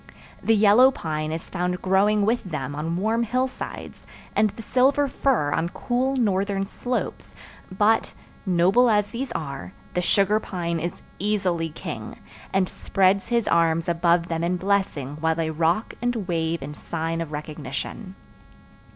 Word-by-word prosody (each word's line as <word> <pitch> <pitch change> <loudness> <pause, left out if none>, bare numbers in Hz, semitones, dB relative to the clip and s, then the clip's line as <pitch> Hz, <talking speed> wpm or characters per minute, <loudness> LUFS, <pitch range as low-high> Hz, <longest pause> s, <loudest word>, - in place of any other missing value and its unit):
The 225 - +3
yellow 215 +5 +7
pine 155 - -3
is 160 +1 -5
found 180 +1 -2
growing 200 +2 +3
with 235 +3 +1
them 145 -6 -4
on 160 +3 -2
warm 220 +5 +1
hillsides, 255 +3 -3 0.3
and 215 0 +4
the 225 - -10
silver 270 +5 +3
fir 250 - +1
on 165 +3 0
cool 255 +7 -1
northern 200 -4 +1
slopes 245 +5 -4 0.4
but, 210 +4 +2 0.3
noble 190 +6 +4
as 210 -2 +2
these 255 +4 -4
are, 140 - -5 0.2
the 180 - +1
sugar 200 +3 +3
pine 170 -5 -3
is 175 +2 -5 0.2
easily 185 -5 0
king, 155 - -7 0.3
and 190 -1 +2
spreads 195 +1 +1
his 235 -2 +1
arms 165 0 +2
above 170 0 +2
them 165 -1 -2
in 180 +1 +1
blessing 180 -8 -1
while 160 0 +1
they 160 -1 -1
rock 165 +7 0
and 240 -5 -1
wave 165 -3 -1
in 145 +2 -6
sign 165 +2 -3
of 160 -2 -5
recognition. 150 - -6
185 Hz, 150 wpm, -24 LUFS, 165-215 Hz, 0.4 s, yellow